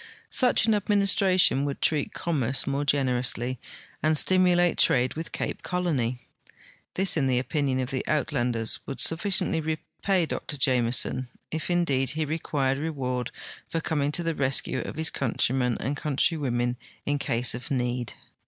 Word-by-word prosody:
Such 250 -4 +3
an 225 - +3
administration 195 -6 +3
would 140 -1 -3
treat 150 -3 0
commerce 135 -6 0
more 140 +1 -1
gen 140 -1 +2
erously 125 0 +1 0.4
and 155 0 +2
stimulate 180 0 +3
trade 125 0 +3
with 160 +1 -6
Cajie - - -3
Colon}'. 150 -10 -1 0.8
This, 190 0 +5
in 140 -5 +1
the 130 -1 +2
opinion 135 +1 -1
of 130 0 -3
the 130 - -2
Uitlanders, 120 -7 0
would 135 - -5
sufhciently 165 -1 +2
rejiay 160 +3 -1
Dr 145 - -4
Jameson, 130 -1 +1 0.2
if, 160 +2 -3
indeed, 145 -7 +1
he 155 0 -2
re<piired 140 -3 -1
reward 130 -6 -3 0.4
for 165 - -1
coming 145 -3 -1
to 175 - 0
the 165 0 -1
re.scue 135 -2 0
of - - -7
his 160 +1 +2
countrymen 125 -1 0
and 140 - -2
countrywomen 130 -5 -1 0.3
in 145 0 0
case 120 -2 0
of 120 +1 -7
need. 125 -2 -2
140 Hz, 150 wpm, -26 LUFS, 125-165 Hz, 0.8 s, This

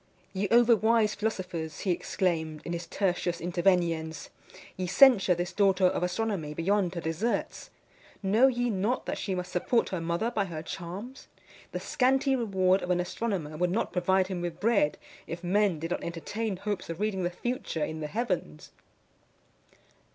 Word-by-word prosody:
"Ye 195 +1 -1
overwise 230 -2 +4
philosophers," 180 -7 -3
he 190 - 0
exclaimed, 160 -4 -1
in 170 - -3
his 170 0 -5
Tertius 175 -3 -1
Interveniens; 170 -3 0 0.5
"ye 185 -1 -3
censure 210 -5 +6
this 175 +2 -3
daughter 195 -1 +3
of 180 - +2
astronomy 180 -4 -2
beyond 185 +1 +1
her 170 - -3
deserts! 165 +9 -2 0.5
Know 215 +7 +5
ye 245 -2 0
not 210 +6 -1
that - - -3
she 195 -2 -2
must 180 0 -4
support 230 +6 +1
her 185 -3 -3
mother 170 +8 -1
by 205 -4 0
her 160 -4 -6
charms? 190 +9 -7 0.4
The - - -3
scanty 270 +1 +2
reward 190 -5 +2
of 180 - -5
an 180 -1 +2
astronomer 180 -4 -3
would 180 +2 +1
not 210 +6 -1
provide 190 +1 +2
him 185 -2 -4
with 175 -1 -4
bread, 205 -9 +2 0.3
if 170 +2 -6
men 195 0 +2
did 165 +3 -5
not - - -2
entertain 190 +5 -3
hopes 205 -2 -4
of 165 +1 -5
reading 210 -2 -1
the 175 - 0
future 180 -5 -3
in 155 - -6
the 150 - -3
heavens." 185 - -3
185 Hz, 165 wpm, -28 LUFS, 170-215 Hz, 0.5 s, censure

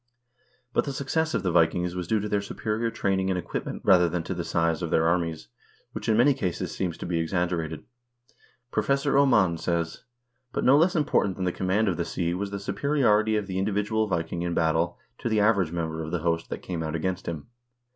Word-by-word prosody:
But - - +2
the 140 - -3
success 155 +4 -1
of - - -1
the 90 - +1
Vikings 85 +1 +2
was 90 -2 -4
due 110 +2 +2
to 105 - -3
their 105 -1 0
superior 110 +3 -2
training 95 -4 0
and 95 - 0
equipment 90 - -5
rather 90 -2 +6
than 85 0 -2
to 95 - -4
the 85 -1 -3
size 85 0 0
of 85 - -2
their 80 - +2
armies, 80 -6 0 0.4
which - - -4
in 110 - +4
many 135 +4 +5
cases 95 -10 -3
seems 90 -3 -2
to - - -6
be 85 -1 -1
exaggerated. 80 -2 -1 0.9
Professor 140 0 +1
Oman 105 -12 +4
says: 85 -1 -2 0.2
" 120 +1 -50
But - - -1
no 130 - +6
less 170 +5 +4
important 145 - +1
than 95 - -3
the 90 - +1
command 95 +5 0
of 90 -4 0
the 85 - -1
sea 85 -1 -2
was 100 +3 -3
the 100 - -4
superiority 110 -2 +2
of 105 -1 0
the 95 -1 -3
individual 105 +2 0
Vi 85 -4 0
king 85 +1 -5
in 85 0 -2
battle 80 +1 +1 0.2
to 120 - -2
the 110 -1 +2
average 100 -6 +3
member 80 -2 -3
of 80 - -5
the 85 -1 -2
host 85 0 0
that - - -5
came 85 -3 -4
out 80 0 -3
against 95 +3 -2
him. 80 -3 -4
95 Hz, 220 wpm, -26 LUFS, 85-110 Hz, 0.9 s, rather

